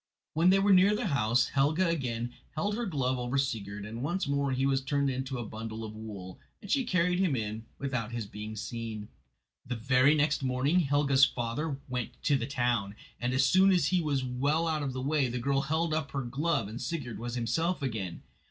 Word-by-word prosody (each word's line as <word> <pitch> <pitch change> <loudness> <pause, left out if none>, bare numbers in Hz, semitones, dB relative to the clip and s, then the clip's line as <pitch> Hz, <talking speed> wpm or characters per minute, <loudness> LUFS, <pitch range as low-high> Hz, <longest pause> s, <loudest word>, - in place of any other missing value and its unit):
When 165 +3 +4
they 190 - +6
were 195 0 +4
near 195 +3 +6
the 220 - -2
house 120 - +2
Helga 155 +6 +2
again 120 -7 -2 0.2
held 205 +7 0
her 235 0 -2
glove 130 -7 0
over 125 +2 -1
Sigurd, 105 -7 -2
and 115 +3 -6
once 175 +5 -1
more 140 -1 0
he 130 +1 +1
was 135 0 +2
turned 140 0 0
into 130 0 -3
a 120 - -4
bundle 110 +1 -6
of 110 -1 -7
wool, 100 -4 -8 0.2
and 200 - -8
she 270 -3 +2
carried 180 -3 +2
him 180 -8 +2
in 110 -1 -4
without 125 -5 -3
his 120 -2 -3
being 105 +2 -7
seen. 110 -1 -5 0.6
Very 125 +3 +3
early - - +2
next 150 0 +2
morning 135 +6 +2
Helga's 140 -3 +4
father 135 +5 -2
went 125 -2 -3
to 145 - +3
the 120 -3 -1
town, 120 -7 0 0.2
and 125 +1 -1
as 130 +1 +3
soon 190 +1 +5
as 175 -6 +3
he 185 -1 +2
was 140 -4 0
well 140 +6 0
out 155 -2 0
of 135 -2 -2
the 130 0 -4
way 145 -1 +2
the 125 - -3
girl 135 +3 +1
held 160 +2 0
up 155 -3 -1
her 135 -1 -1
glove 135 -1 0
and 110 +4 -7
Sigurd 140 -9 -4
was 120 +1 -4
himself 140 +8 0
again. 110 -9 -4
135 Hz, 210 wpm, -30 LUFS, 120-155 Hz, 0.6 s, they